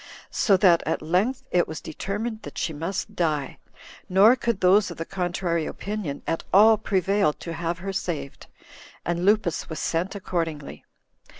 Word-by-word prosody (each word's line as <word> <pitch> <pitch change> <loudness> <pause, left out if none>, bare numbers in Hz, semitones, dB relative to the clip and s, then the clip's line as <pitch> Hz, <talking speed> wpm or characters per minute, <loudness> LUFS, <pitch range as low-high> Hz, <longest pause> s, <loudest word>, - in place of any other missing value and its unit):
So 195 -3 +3
that 180 -3 +5
at - - -1
length 210 +12 0
it 175 -1 +3
was 160 - -6
determined 215 +7 -4
that - - -10
she 160 - -2
must 165 +6 -4
die; 150 -5 -1 0.5
nor 200 +6 +6
could 235 -5 -1
those 190 +2 +4
of 170 - -8
the 165 - -4
contrary 175 -3 -2
opinion 200 -9 -5
at 165 - -2
all 215 +3 +7
prevail 195 -5 +1
to 170 - -7
have 170 +1 -3
her 195 +2 -5
saved; 165 -7 -4 0.6
and 175 0 -1
Lupus 200 -3 +1
was 160 - -5
sent 175 +7 -1
accordingly. 165 -6 -4
180 Hz, 160 wpm, -25 LUFS, 165-200 Hz, 0.6 s, all